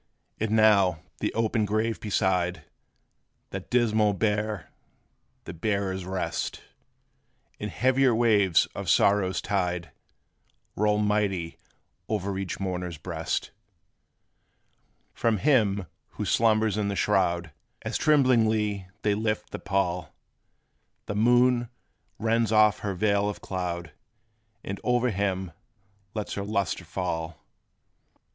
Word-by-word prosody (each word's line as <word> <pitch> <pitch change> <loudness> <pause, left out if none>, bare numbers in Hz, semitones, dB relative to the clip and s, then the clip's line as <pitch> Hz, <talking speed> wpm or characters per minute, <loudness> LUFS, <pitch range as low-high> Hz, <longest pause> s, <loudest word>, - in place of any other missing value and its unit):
And 110 - -1
now, 100 -6 +4 0.2
the - - -1
open 110 0 +1
grave 110 +2 0
beside, 90 -5 0 0.9
That - - -6
dismal 110 -4 +3
bier 105 0 -1 0.7
the - - -8
bearers 95 0 -2
rest; 95 0 -3 1.0
And 105 - -4
heavier 130 +1 +3
waves 105 -7 +4
of - - -4
sorrow's 100 -2 +3
tide 90 -3 -1 0.8
Roll 105 0 +2
mighty 105 -5 0 0.5
o'er 100 -2 -1
each 95 -2 -4
mourner's 90 -3 -3
breast. 80 0 -3 1.6
From 115 -2 +1
him 105 -7 +2 0.3
who - - -4
slumbers 110 -2 +2
in 105 - 0
the 100 - -2
shroud, 85 -5 +1 0.3
As - - -4
tremblingly 110 -9 +2 0.2
they 105 - +3
lift 110 +1 -2
the - - -5
pall, 90 -2 -1 0.9
The - - -4
moon 120 +2 +3 0.5
rends 115 0 +1
off 105 -1 +5
her 100 -2 -3
veil 100 +1 +2
of 105 - -6
cloud, 85 -3 -4 0.7
And 100 0 -5
o'er 125 0 +2
him 95 -2 -1 0.6
lets 105 -2 -3
her 100 - -3
lustre 100 -3 -2
fall. 80 -2 -3
105 Hz, 110 wpm, -27 LUFS, 95-110 Hz, 1.6 s, off